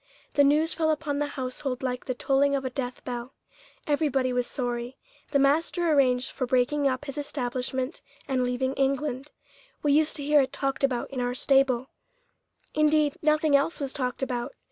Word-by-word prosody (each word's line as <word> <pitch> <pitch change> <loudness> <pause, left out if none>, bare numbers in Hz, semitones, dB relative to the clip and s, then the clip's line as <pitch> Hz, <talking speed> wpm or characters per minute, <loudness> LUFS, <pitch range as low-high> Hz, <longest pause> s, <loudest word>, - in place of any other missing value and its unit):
The 285 - +5
news 305 +3 +3
fell 315 -1 +1
upon 300 -2 -1
the 295 - 0
household 260 -1 -4
like 250 -1 -2
the 255 - -2
tolling 280 +2 +2
of 270 -1 -2
a 260 - -2
death 250 -1 -5
bell. 245 +1 -5 0.5
Everybody 275 -4 +1
was 245 -1 0
sorry. 245 0 -3 0.3
The 280 - +2
master 320 +5 +2
arranged 260 -3 +3
for 255 - -3
breaking 260 +3 +2
up 260 +2 -1
his 280 0 -4
establishment 260 0 -3 0.3
and 260 -2 +1
leaving 250 +1 -1
England. 275 0 -1 0.5
We 290 -1 +3
used 310 +1 +3
to 290 - -4
hear 295 0 +5
it 265 -1 -2
talked 275 -1 -2
about 255 -2 0
in 260 -2 -3
our 245 0 -1
stable; 265 -1 +2 0.8
indeed, 305 -1 +3
nothing 305 -1 +3
else 285 +4 +1
was 275 -2 -3
talked 255 -1 -3
about. 250 - -3
270 Hz, 175 wpm, -27 LUFS, 255-290 Hz, 0.8 s, The